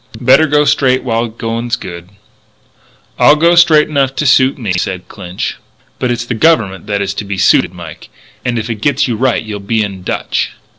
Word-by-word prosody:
Better 135 +6 +4
go 150 0 +2
straight 130 -2 +2
while 115 -2 -1
the - - -6
going's 115 +1 -2
good." 85 0 -9 1.1
"I 150 - +6
go 170 +3 +3
straight 165 -3 +5
enough 135 -3 0
to 150 - -2
suit 130 0 +3
me," 110 -8 -3
said 90 0 -3
Clinch. 90 +1 -6 0.4
"But 125 - -1
it's 120 0 -2
the 120 - -3
Government 110 -9 +1
that 100 -1 -1
is 100 0 -3
to 105 - -5
be 100 -1 -5
suited, - - +3
Mike. - - -11 0.3
And 120 -1 -1
if 110 0 -3
it 110 -3 -5
gets 145 +1 +1
you 120 - -1
right 125 0 0
you'll 105 -2 -6
be 110 +2 -1
in 100 -2 -6
dutch." - - -3
120 Hz, 200 wpm, -14 LUFS, 100-135 Hz, 1.1 s, I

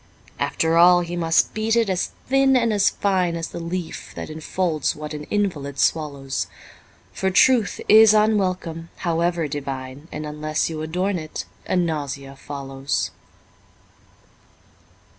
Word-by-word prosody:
After 165 0 +1
all 175 +1 +7
he 175 0 -4
must 165 -1 +2
beat 220 +1 0
it 230 -2 +3
as 185 -2 -1 0.2
thin 270 0 +4
and 230 -3 +2
as 205 -1 +4
fine 185 -4 0
As 165 -1 -4
the - - -7
leaf 170 0 -5
that - - -6
enfolds 160 0 -1
what 150 0 -7
an 150 0 -6
invalid 150 -10 -2
swallows, 140 -4 0 0.7
For 190 - 0
truth 225 +3 +4
is 220 0 +8
unwelcome, 185 -6 +1 0.2
however 170 -1 +1
divine, 135 0 -6
And 150 0 -5
unless 155 +1 -2
you 155 -1 -4
adorn 180 +4 -1
it, 155 -1 -6 0.2
a - - 0
nausea 145 -5 -2
follows. 135 0 -3
165 Hz, 135 wpm, -22 LUFS, 150-190 Hz, 0.7 s, is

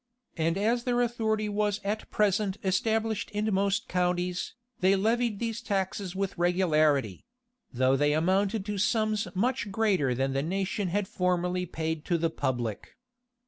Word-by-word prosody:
[*] - - -46
And 165 +1 0
as 230 +4 +1
their 245 -1 +1
authority 220 -3 0
was 210 0 0
at 210 +2 -3
present 205 -1 +1
established 220 +3 0
in 210 0 -1
most 200 +3 +1
counties, 180 0 -1 0.2
they 190 +1 +4
levied 225 +2 +1
these 230 +1 -3
taxes 195 -2 -2
with 195 -1 -3
regularity; 155 - +2 0.5
though 130 +2 +2
they 145 +2 +2
amounted 190 +6 +1
to 205 -1 -3
sums 215 0 +1
much 235 +1 0
greater 190 - +1
than 135 +1 0
the 135 - 0
nation 190 +4 -1
had 195 +3 -1
formerly 180 0 0
paid 160 -1 -3
to 175 - +1
the 165 0 0
public. 120 -8 -3
190 Hz, 150 wpm, -28 LUFS, 170-215 Hz, 0.5 s, they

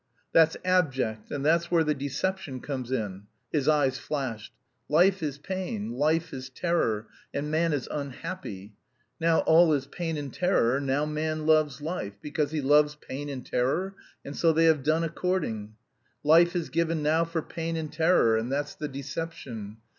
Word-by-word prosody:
"That's 160 0 +5
abject; 135 -12 +1
and 145 -1 -3
that's 170 +2 +3
where 170 -2 +4
the 150 -1 +1
deception 140 +2 -3
comes 130 -2 -5
in." 105 -5 -3 0.2
His 145 -3 0
eyes 145 -4 +3
flashed. 125 -7 -4 0.4
"Life 180 +5 +4
is 145 -3 -2
pain, 150 - -4
life 155 +5 +1
is 130 0 -6
terror, 130 -8 0 0.3
and 150 +2 -2
man 165 +1 +2
is 145 -4 -1
unhappy. 140 - -6 0.5
Now 165 0 +3
all 165 +1 +5
is 140 -2 0
pain 165 +2 -4
and 145 -2 -5
terror. 140 -9 +2
Now 140 +2 +1
man 155 0 -2
loves 155 -3 +3
life, 150 - -4
because 150 +1 -1
he 155 -1 -2
loves 150 +2 +4
pain 145 0 -7
and 130 -3 -6
terror, 160 +11 0 0.3
and 140 - -6
so 165 - +4
they 165 +1 +3
have 160 -3 +4
done 155 +4 +2
according. 155 - -2 0.5
Life 170 +4 +5
is 170 -6 -1
given 165 0 0
now 160 +2 +3
for 165 -1 -3
pain 165 0 -4
and 155 -2 -5
terror, 160 -8 +4
and 115 +3 -2
that's 145 +1 -1
the 150 - -5
deception. 135 -6 -6
150 Hz, 170 wpm, -27 LUFS, 135-165 Hz, 0.5 s, That's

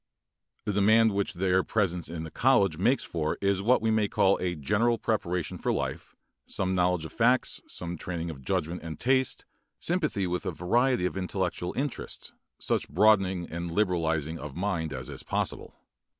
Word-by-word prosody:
The 105 - -1
demand 110 +3 +5
which 100 -1 -1
their 95 +1 +2
presence 90 -6 -1
in 85 -1 -5
the 80 - -7
college 100 -11 +3
makes 120 +8 +2
is - - -9
for 80 -2 -2 0.3
what 120 +2 +3
we 110 - +2
may 110 -1 +2
call 100 0 +3
a 90 -1 -1
general 110 +10 +1
preparation 90 -7 -2
for - - 0
life, - - -3 0.3
some 95 -1 -1
knowledge 90 -2 +1
of 80 - -9
facts, - - +2
some 85 -2 -4
training 85 -2 -4
of 70 -4 -11
judgment 90 0 -1
and 80 -1 -7
taste, 130 0 +1 0.3
sympathy 155 - 0
with 90 0 -2
a - - 0
variety 115 - +1
of 90 - -2
intellectual 90 -2 -2
interests, 135 0 -4 0.2
such - - -1
broadening 95 0 +3
and 85 +1 -4
liberalizing 80 -4 0
of 70 -2 -7
mind 85 -4 -1
as 65 -1 -5
is - - -6
possible. - - -3
90 Hz, 170 wpm, -28 LUFS, 85-105 Hz, 0.3 s, demand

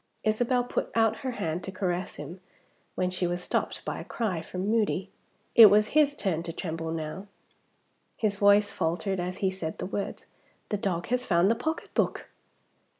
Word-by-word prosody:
Isabel 245 +3 +2
put 245 - -2
out 225 -1 +3
her 260 +1 -4
hand 165 -5 -3
to 190 - -5
caress 185 -1 -2
him, 150 +6 -8 0.6
when 180 0 0
she 180 -1 -1
was 175 +1 -2
stopped - - -2
by - - -3
a - - -6
cry 195 -8 -2
from 180 +3 -4
Moody. 205 -3 +1 0.4
It 225 -2 +11
was 210 +1 +4
his 290 -1 +3
turn 180 - -1
to 170 0 -5
tremble 165 -1 -4
now. 165 +4 -5 0.9
His 210 -2 0
voice 205 0 +4
faltered 185 +3 -1
as 180 +1 -3
he 190 - +3
said 170 -4 -5
the - - -4
words, 200 +1 -4 0.4
"The 210 - 0
dog 180 -4 -2
has 250 +1 +1
found 175 +3 +4
the - - +2
pocketbook!" 315 +8 -2
195 Hz, 175 wpm, -28 LUFS, 175-215 Hz, 0.9 s, It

